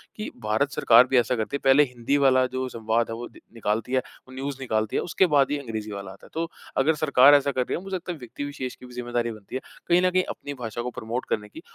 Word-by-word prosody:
कि 215 Hz, -, -5 dB
भारत 110 Hz, +7 st, +1 dB
सरकार 120 Hz, -2 st, +6 dB
भी 130 Hz, -, +2 dB
ऐसा 120 Hz, +1 st, +2 dB
करती 110 Hz, +4 st, -2 dB
है, -, -, -2 dB
पहले 135 Hz, +2 st, +6 dB
हिंदी 125 Hz, +1 st, -1 dB
वाला 130 Hz, -2 st, +4 dB
जो 130 Hz, 0 st, -1 dB
संवाद 115 Hz, 0 st, 0 dB
है, 115 Hz, -, -3 dB
वो 120 Hz, +1 st, -6 dB
द -, -, -17 dB
निकालती 115 Hz, +1 st, -2 dB
है, 130 Hz, -, +4 dB, 0.3 s
वो 130 Hz, -, -13 dB
न्यूज़ 135 Hz, +1 st, -4 dB
निकालती 110 Hz, -4 st, -1 dB
है, -, -, +2 dB
उसके 175 Hz, +2 st, +2 dB
बाद 140 Hz, -1 st, +4 dB
ही 145 Hz, -, +1 dB
अंग्रेज़ी 110 Hz, -5 st, -5 dB
वाला 100 Hz, -1 st, -6 dB
आता 95 Hz, -, -15 dB
है। -, -, -16 dB
तो 165 Hz, +1 st, -2 dB, 0.3 s
अगर 155 Hz, +4 st, +3 dB
सरकार 145 Hz, -2 st, +6 dB
ऐसा 140 Hz, 0 st, +2 dB
कर 130 Hz, -, 0 dB
रही 125 Hz, -, -2 dB
है, -, -, -7 dB
मुझे 195 Hz, -1 st, -4 dB
लगता 180 Hz, 0 st, -4 dB
है, 170 Hz, -, -6 dB
व्यक्ति 125 Hz, +2 st, -7 dB
विशेष 140 Hz, -3 st, -5 dB
की -, -, -14 dB
भी 125 Hz, -, -13 dB
ज़िम्मेदारी 120 Hz, -1 st, -2 dB
बनती 110 Hz, +1 st, -10 dB
है, 130 Hz, -, -2 dB, 0.3 s
कहीं 175 Hz, +1 st, +4 dB
न -, -, +5 dB
कहीं 185 Hz, 0 st, +3 dB
अपनी 145 Hz, -, -6 dB
भाषा 115 Hz, 0 st, -4 dB
को 125 Hz, -, -3 dB
प्रमोट 120 Hz, +3 st, -4 dB
करने 105 Hz, -1 st, -1 dB
की -, -, -11 dB
125 Hz, 275 wpm, -25 LUFS, 115-140 Hz, 0.3 s, सरकार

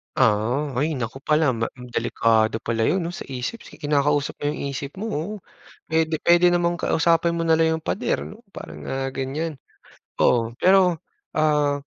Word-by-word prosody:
Ah, 125 Hz, +5 st, +1 dB
hay 150 Hz, +6 st, +1 dB
naku 130 Hz, -1 st, -5 dB
pala 150 Hz, -4 st, +2 dB
ma 115 Hz, 0 st, -2 dB, 0.2 s
delikado 115 Hz, -1 st, +2 dB
pala 115 Hz, -1 st, -1 dB
'yon, 170 Hz, +11 st, +2 dB
'no, 170 Hz, 0 st, -4 dB
sa -, -, -6 dB
isip 130 Hz, -, -5 dB
si -, -, -14 dB
kinakausap 145 Hz, 0 st, +1 dB
mo -, -, -12 dB
'yong -, -, -6 dB
isip 140 Hz, 0 st, -5 dB
mo, 220 Hz, -, -3 dB
oh. 205 Hz, -1 st, -3 dB, 0.5 s
Puwede 160 Hz, -1 st, +1 dB
puwede 175 Hz, +2 st, +5 dB
namang 175 Hz, 0 st, +1 dB
kausapin 170 Hz, 0 st, +2 dB
mo 165 Hz, 0 st, -2 dB
na 160 Hz, -, +5 dB
lang 160 Hz, 0 st, +2 dB
'yong -, -, -26 dB
pader, -, -, -1 dB
'no, 225 Hz, +4 st, -13 dB
parang, 75 Hz, -, -9 dB
ah, 135 Hz, 0 st, -2 dB
ganyan, 145 Hz, +4 st, -3 dB, 0.6 s
oo. 115 Hz, -2 st, +3 dB
Pero, 185 Hz, -1 st, +4 dB, 0.4 s
ah 150 Hz, -2 st, +2 dB
150 Hz, 170 wpm, -23 LUFS, 130-165 Hz, 0.6 s, puwede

